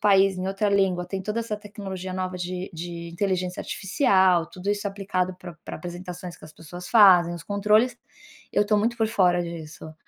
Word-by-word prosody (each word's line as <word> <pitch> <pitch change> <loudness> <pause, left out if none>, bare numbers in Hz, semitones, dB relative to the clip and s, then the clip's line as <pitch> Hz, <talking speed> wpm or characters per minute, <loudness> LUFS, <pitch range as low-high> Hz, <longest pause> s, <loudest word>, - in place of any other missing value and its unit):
país, 195 -2 +4
em 185 - -3
outra 195 +2 0
língua, 190 -3 +2
tem 195 -1 -4
toda 210 +4 -2
essa 220 -2 -3
tecnologia 195 -3 -7
nova 185 0 -3
de 180 +1 -4
de 170 0 -6
inteligência 185 0 -2
artificial, 190 - +2
tudo 185 +3 -4
isso 205 0 -1
aplicado 190 -2 -2
pra 180 -3 -10
pra - - -6
apresentações 175 +1 -7
que - - -15
as 155 - -13
pessoas 175 +2 -10
fazem, 185 -7 +6
os 170 - -8
controles, 215 +4 +2 0.5
eu 205 - +2
tô 210 0 +3
muito 230 +3 0
por 220 - +3
fora 180 -5 +3
disso. 160 -2 -8
185 Hz, 185 wpm, -25 LUFS, 175-205 Hz, 0.5 s, fazem